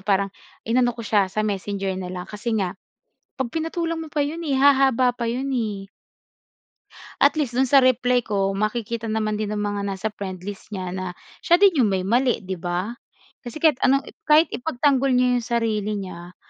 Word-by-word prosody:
parang 195 0 0 0.3
inano 245 +1 +1
ko 230 - -6
siya 205 -2 +2
sa 215 +3 -2
Messenger 195 -2 -2
na 180 - -5
lang 180 -1 -5
kasi 220 +2 -3
nga 185 -4 -1 0.6
'pag 260 -3 -3
pinatulan 330 0 -2
mo 320 - -7
pa 295 -1 0
'yon, 315 +4 -4
eh, 270 - +1
hahaba 265 -2 +4
pa 235 -1 -3
'yon, 260 +4 -2
eh. 210 -6 -3 1.3
At 285 - +6
least 245 -4 -2
do'n 265 - +4
sa 275 0 +7
reply 250 -1 +3
ko 195 -4 -1
makikita 220 +2 -2
naman 215 -1 -1
din 215 - -2
ang 210 0 -2
mga 205 -1 -2
nasa 195 +2 -2
friendlist 195 0 -7
niya 185 -4 -5
na 185 0 -4 0.3
siya 345 - +4
din 375 -7 +4
'yong 225 - +4
may 190 -2 -1
mali 240 +1 +1
'di 185 -2 -5
ba 180 +5 -2 0.5
kasi 240 +2 -9
kahit 310 -4 +3
anong 275 +1 +3 0.2
kahit 310 +2 +5
ipagtanggol 275 -1 +1
niya 250 0 +3
'yong 235 - -9
sarili 220 -3 0
niya, 180 -2 -8
225 Hz, 185 wpm, -23 LUFS, 200-265 Hz, 1.3 s, sa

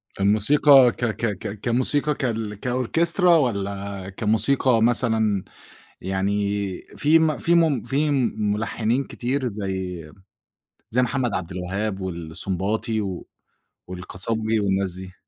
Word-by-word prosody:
فالموسيقى 125 +6 +5
ك 120 - -3
ك 110 0 -2
ك 105 -1 -6
كموسيقى 135 +5 +1
كـال 110 -5 -3
كOrchestra 160 - +1
والّا 100 - +1
كموسيقى 115 +3 +2
مثلًا 110 -4 +2 0.6
يعني 95 +1 -1 0.5
في 155 +3 +2
م 155 -2 +1
في 170 - +2
م 160 -8 +2
في 145 +5 0 0.2
ملحنين 110 +4 -1
كتير 130 +2 -3
زَي، 95 -6 -5 0.8
زَي 125 +3 +2
محمد 125 -2 -1
عبد 90 0 -4
الوهاب 95 +3 -3
والسنباطي 95 +5 -3 0.9
والقصبجي 110 +5 -2
والناس 95 -2 0
دي؟ 95 0 -9
110 Hz, 105 wpm, -23 LUFS, 95-130 Hz, 0.9 s, فالموسيقى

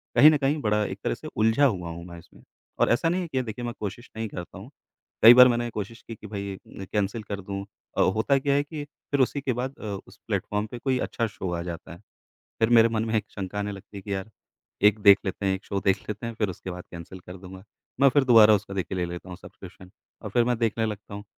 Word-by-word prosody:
कहीं 150 - +9
न 150 - +3
कहीं, 140 +2 +1
बड़ा 105 -2 +1
एक - - -6
तरह - - 0
से - - -10
उलझा 110 +6 +4
हुआ 90 -9 0
हूँ 85 +1 -7
मैं 85 -1 -10
इसमें। - - -19 0.4
और - - +4
ऐसा 140 +8 +2
नहीं 180 +2 0
है 175 - -4
कि 130 -5 -1
देखिए, 120 +1 -6
मैं 120 - -3
कोशिश 110 +4 -6
नहीं 110 0 -2
करता 90 -3 -8
हूँ, - - -10 0.5
कई 115 +2 +12
बार 125 +1 +9
मैंने 120 -1 0
कोशिश 115 +1 -6
की 115 - -6
कि 105 - -11
भई 100 -1 -5
ए - - -9 0.2
न - - -5
कैंसल 105 +2 -1
कर 100 -1 -5
दूँ 100 +1 -5 0.3
अ, - - +4
होता 110 +8 +2
क्या 140 +1 +1
है 145 - +2
कि 150 0 -7 0.3
फिर 140 - +1
उसी 140 +2 +1
के 130 -2 -1
बाद 130 +3 -4
अ, - - -11 0.2
उस - - -16
प्लेटफ़ॉर्म 105 +1 -1
पे 120 - -6
कोई 130 +1 0
अच्छा 115 - -1
शो 95 -3 -5
आ 85 - -2
जाता 85 -1 -7
है। 85 - -13 0.6
फिर 115 - +3
मेरे 115 -1 +6
मन 110 -1 -1
में 110 - -3
एक 110 - 0
शंका 100 +1 -4
आने 105 0 -2
लगती 100 +1 -10
है - - -7
कि, 100 +1 -4
यार, 95 +2 -5 0.5
एक 105 +1 +5
देख 100 -1 +8
लेते 95 +1 -3
हैं, 95 -1 +2
एक 95 - -11
शो 100 - -2
देख 95 0 +4
लेते 105 +3 -4
हैं, 115 - -4
फिर 105 -3 0
उसके 95 +1 -7
बाद 90 0 -7
कैंसल 85 +2 -9
कर 90 +1 -11
दूँगा। 95 0 -11 0.4
मैं 140 - +8
फिर 145 +2 +3
दोबारा 115 -4 +7
उसका 100 0 -5
देखिए, 95 -1 -3
ले 90 - 0
लेता 85 +1 -8
हूँ 90 - -7
सब्सक्रिप्शन, 95 0 -13 0.3
और 110 - -6
फिर 120 0 +3
मैं 125 -1 +1
देखने 115 0 +1
लगता 105 -1 -7
हूँ, 105 - -7
105 Hz, 265 wpm, -26 LUFS, 95-120 Hz, 0.6 s, कई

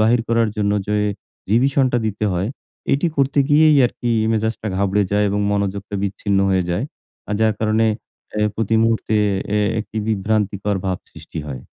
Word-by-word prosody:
বাহির 115 +2 +4
করার 115 -1 +2
জন্য 100 -1 +1
যে 105 - 0 0.6
রিভিশনটা 130 +1 +3
দিতে 105 0 -2
হয় 90 +3 -1 0.4
এটি 140 +5 +2
করতে 140 +1 +1
গিয়েই 155 0 +5
আর - - -7
কি 120 - -1 0.2
মেজাজটা 110 0 -1
ঘাবড়ে 100 +1 +2
যায় 105 +1 +2
এবং 100 +1 0
মনোযোগটা 100 0 -2
বিচ্ছিন্ন 100 0 -1
হয়ে 95 -1 +2
যায় 90 +8 -1 0.4
আর 105 - -1
যার 110 -1 +3
কারণে 110 +1 +2 0.5
এ - - +3
প্রতি 115 0 0
মুহূর্তে 115 -1 +1 0.4
এ - - +2 0.2
একটি 110 +1 -9
বিভ্রান্তিকর 105 -1 0
ভাব 95 -1 -1
সৃষ্টি 80 - -8
হয়। 65 -4 -6
105 Hz, 165 wpm, -20 LUFS, 100-115 Hz, 0.6 s, গিয়েই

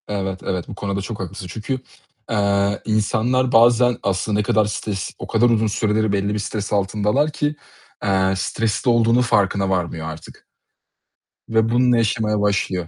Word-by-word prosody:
Evet, 95 -2 -3
evet, 90 -2 -3
bu - - -8
konuda 100 -1 -3
çok 105 +2 -6
haklısın 90 0 -6
çünkü, 110 +8 -4 0.5
eee, 100 -1 +1
insanlar 115 +4 +1
bazen 120 0 +5
aslında 100 +2 0
ne - - +1
kadar 105 +1 +2
stres 105 -2 -4
o - - -6
kadar 120 +1 +3
uzun 110 -1 +2
süreleri 110 0 0
belli 100 +1 0
bir 105 - -2
stres 105 0 -4
altındalar 105 +9 +1
ki, 150 0 -1 0.5
eee, 95 -1 +2
stresli 115 +5 -1
olduğunun 115 +1 +4
farkına 100 -4 +1
varmıyor 85 -4 -2
artık 80 0 -11 1.1
ve 110 0 +2
bununla 125 +1 +3
yaşamaya 110 -2 0
başlıyor. 95 -3 0
105 Hz, 155 wpm, -21 LUFS, 100-115 Hz, 1.1 s, bazen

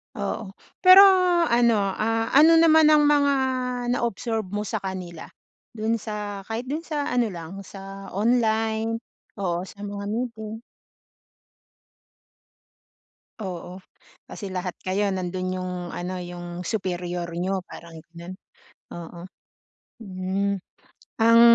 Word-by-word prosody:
Oo. 200 -3 -4 0.2
Pero 370 +1 +9 0.5
ano, 235 -1 +4
ah, 215 +3 0
ano 315 +4 +7
naman 320 -1 +6
ang 305 -1 +6
mga 290 -1 +4 0.6
na 245 - +1
observe 225 -1 -3
mo 205 +3 -3
sa 215 +1 -3
kanila? 185 -4 -6 0.5
Do'n 225 +1 0
sa, 205 -2 -6
kahit 235 +4 -4
do'n 320 +3 -3
sa 295 -2 -2
ano 245 -2 +2
lang 170 +3 -8
sa 195 0 -9
online, 225 0 +1 0.3
oo 180 -2 -2
sa 200 - -12
mga 200 0 -5
meeting. 225 -1 -4 2.8
Oo. 185 0 -7 0.5
Kasi 200 - -7
lahat 180 -1 -3
kayo 200 +2 0
nando'n 185 0 -3
yung 185 0 -4 0.2
ano 180 +1 -4
yung 175 0 -7
superior 180 -3 -3
nyo 190 +3 -1
parang 165 -1 -11
gano'n. 170 +3 -10 0.6
Oo. 170 0 -9 0.8
Hmm, 195 +1 -2 0.6
ang 230 +1 +7
200 Hz, 115 wpm, -24 LUFS, 185-230 Hz, 2.8 s, Pero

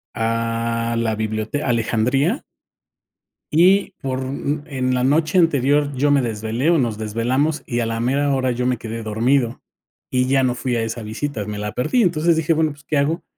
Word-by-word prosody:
a 115 +1 -1
la 115 -1 0
bibliote 110 +5 -2
Alejandría 125 - +1 1.1
y 185 +5 +4
por, 130 -2 -2
mm, 140 +2 -3
en 130 -4 -1
la 125 0 +1
noche 155 +6 +2
anterior 145 -2 +2
yo 145 +3 +2
me 140 -1 +4
desvelé, 115 +4 -1
o, 170 - +4
nos 120 -6 0
desvelamos 120 +8 -1
y 120 - -2
a 120 - 0
la 115 0 -2
mera 140 +4 +1
hora 130 -1 0
yo 125 +1 -2
me 125 -1 +1
quedé 115 0 -6
dormido, 120 +3 0 0.5
y 125 0 +1
ya 135 0 +3
no 125 -1 +2
fui 125 -1 -2
a 115 - 0
esa 115 +1 -4
visita, 110 +1 -4
me 105 0 -5
la 105 0 -3
perdí. 185 - +1
Entonces, 170 -3 +2
dije: 160 +1 +2
"Bueno, 160 -1 +1
pues, 145 +1 -14
¿qué 150 +1 -1
hago?, 150 +5 0
130 Hz, 190 wpm, -21 LUFS, 115-145 Hz, 1.1 s, y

